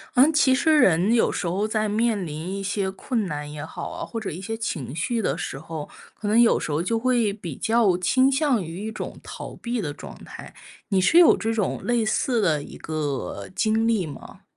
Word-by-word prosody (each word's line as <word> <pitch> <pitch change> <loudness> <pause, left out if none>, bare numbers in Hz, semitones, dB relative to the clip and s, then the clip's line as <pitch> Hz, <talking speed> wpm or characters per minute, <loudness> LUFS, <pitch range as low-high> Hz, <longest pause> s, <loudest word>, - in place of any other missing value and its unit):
嗯， 275 +6 +6
其 290 -4 +4
实 310 +4 +3
人 190 - +4
有 230 - +3
时 185 - -3
候 195 +5 0
在 215 -1 0
面 215 -3 0
临 150 0 -6 0.2
一 - - -4
些 195 0 -1
困 220 +3 -2
难 150 -3 -5
也 150 0 -6
好 - - -6
啊， - - -6
或 230 - -5
者 215 - -4
一 165 - -6
些 220 +4 -4
情 150 - -4
绪 230 +8 -1
的 - - 0
时 - - -5
候， 155 +1 -7 0.2
可 210 - -6
能 215 +3 +4
有 235 -1 +5
时 - - -4
候 150 +3 0
就 225 +5 0
会 240 -4 +2
比 175 -8 -7
较 220 - +2
倾 260 +9 +3
向 270 -6 +2
于 175 +5 -6
一 220 - -3
种 - - -7
逃 - - -8
避 235 -1 -3
的 150 - -3
状 145 - -10
态， - - -10 0.4
你 195 -3 +2
是 330 - +4
有 350 -2 +8
这 225 - -2
种 215 -4 -1
类 240 -2 +1
似 240 +2 +1
的 160 -8 +2
一 - - -10
个 140 - -4
经 220 +1 +2
历 220 -6 +1
吗？ 145 -3 -11
210 Hz, 240 characters per minute, -24 LUFS, 165-230 Hz, 0.4 s, 有